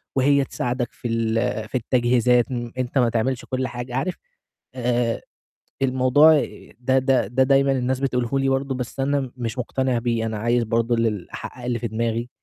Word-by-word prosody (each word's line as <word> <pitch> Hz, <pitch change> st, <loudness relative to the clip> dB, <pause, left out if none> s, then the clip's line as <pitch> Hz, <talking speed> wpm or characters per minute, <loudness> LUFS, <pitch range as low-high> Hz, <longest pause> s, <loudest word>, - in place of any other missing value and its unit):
وهي 140 Hz, +1 st, +4 dB
تساعدك 125 Hz, 0 st, -3 dB
في 120 Hz, -, -6 dB
ال 115 Hz, -1 st, -1 dB
في -, -, -7 dB
التجهيزات 125 Hz, 0 st, +2 dB
أن 120 Hz, -1 st, -4 dB
أنت 130 Hz, +1 st, -2 dB
ما 120 Hz, -3 st, +4 dB
تعملش 120 Hz, +2 st, -1 dB
كل 130 Hz, 0 st, -2 dB
حاجة، 120 Hz, +1 st, -6 dB
عارف 150 Hz, +7 st, -1 dB, 0.6 s
آآ 120 Hz, -2 st, 0 dB, 0.6 s
الموضوع 135 Hz, +4 st, +5 dB, 0.3 s
ده 130 Hz, +1 st, +2 dB
ده 130 Hz, -3 st, +2 dB
ده 125 Hz, +5 st, +2 dB
دايمًا 135 Hz, +1 st, +3 dB
الناس 130 Hz, 0 st, 0 dB
بتقوله 125 Hz, -1 st, 0 dB
لي 135 Hz, 0 st, +1 dB
برضه، 135 Hz, 0 st, 0 dB
بس 125 Hz, +2 st, -6 dB
أنا 140 Hz, +1 st, +1 dB
م 130 Hz, -2 st, -6 dB
مش 120 Hz, +1 st, -4 dB
مقتنع 130 Hz, 0 st, -1 dB
بيه، 115 Hz, -1 st, -1 dB
أنا 110 Hz, -1 st, -3 dB
عايز 120 Hz, +2 st, +1 dB
برضه 115 Hz, +1 st, +1 dB
ال 110 Hz, -5 st, -1 dB
أحقّق 125 Hz, -, -8 dB
اللي 120 Hz, -2 st, -1 dB
في 115 Hz, -, -2 dB
دماغي 115 Hz, +2 st, -2 dB
125 Hz, 180 wpm, -23 LUFS, 115-130 Hz, 0.6 s, الموضوع